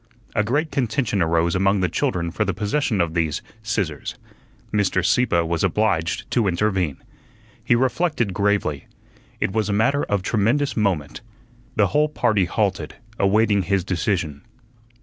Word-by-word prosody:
A 105 - +3
great 145 +8 0
contention 120 -5 0
arose 85 0 +2
among 95 +1 +2
the 90 - +2
children 85 - -1
for - - 0
the 100 - -2
possession 105 +2 0
of 85 -2 0
these 80 -3 -1 0.2
"scissors." 100 -9 -3 0.6
Mr. 95 -3 +1
Sieppe 105 -6 +3
was 85 0 -1
obliged 95 -3 0
to 115 -5 +2
intervene. 90 -4 0 0.7
He - - +3
reflected 130 - 0
gravely. 100 -7 0 0.5
It - - 0
was 110 0 0
a - - +1
matter 115 +8 +2
of 100 -2 -1
tremendous 120 +8 +1
moment. 90 - -1 0.5
The 105 -2 +3
whole 150 +1 +3
party 105 -9 +1
halted, 100 0 -1 0.2
awaiting 105 +1 +3
his 95 0 0
decision. 85 - -2
100 Hz, 145 wpm, -22 LUFS, 85-110 Hz, 0.7 s, A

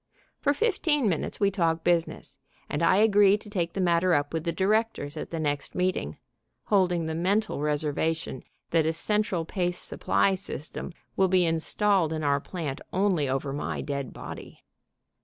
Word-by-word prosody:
For 285 - +2
fifteen 320 - +1
minutes 170 -6 -1
we 200 -1 +3
talk 165 -4 0
business, 170 -2 -1 0.3
and 145 - -3
I 170 +2 +4
agree 205 -1 +5
to 210 - -14
take 170 -4 -1
the - - -4
matter 175 0 +3
up 145 +1 -1
with 160 0 -2
the 170 - +1
directors 195 -4 0
at 155 - -5
the 165 - -4
next 145 -2 -2
meeting, 180 - -1 0.5
holding 180 -4 +2
the 160 - -2
mental 190 +1 0
reservation 150 -1 -1 0.3
that 160 -2 +3
a 160 - +1
central 200 -1 -1
paste 180 0 -2
supply 195 - +1
system 185 -3 -5 0.2
will 190 - +3
be 185 -1 +3
installed 165 +1 +1
in 155 -1 -3
our 140 -1 +2
plant 150 -3 -5
only 185 -7 +1
over 135 +1 -2
my 145 - -3
dead 140 -3 -4
body. - - -9
170 Hz, 165 wpm, -27 LUFS, 155-195 Hz, 0.5 s, agree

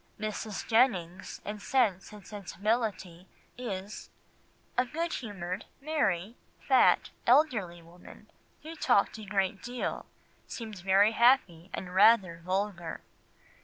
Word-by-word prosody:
Mrs. 215 -1 -4
Jennings, 195 -7 +1
in 210 0 -5
Sense 205 -6 0
and 210 -2 -12
Sensibility, 205 -3 -3 0.3
is 205 -4 -6 0.7
"a 250 - +3
good 325 +6 -3
humoured, 195 -5 -5
merry, 235 - -1 0.2
fat, - - +3 0.2
elderly 225 - +3
woman, 175 +2 -16 0.3
who 320 +1 -7
talked 235 -7 +2
a 215 - -8
great 195 -1 -1
deal, 245 +1 -4 0.4
seemed 220 -5 -7
very 195 +3 +4
happy 225 -8 +3
and 180 -1 -6
rather 190 -4 +5
vulgar." 185 -2 -3
205 Hz, 110 wpm, -30 LUFS, 185-235 Hz, 0.7 s, rather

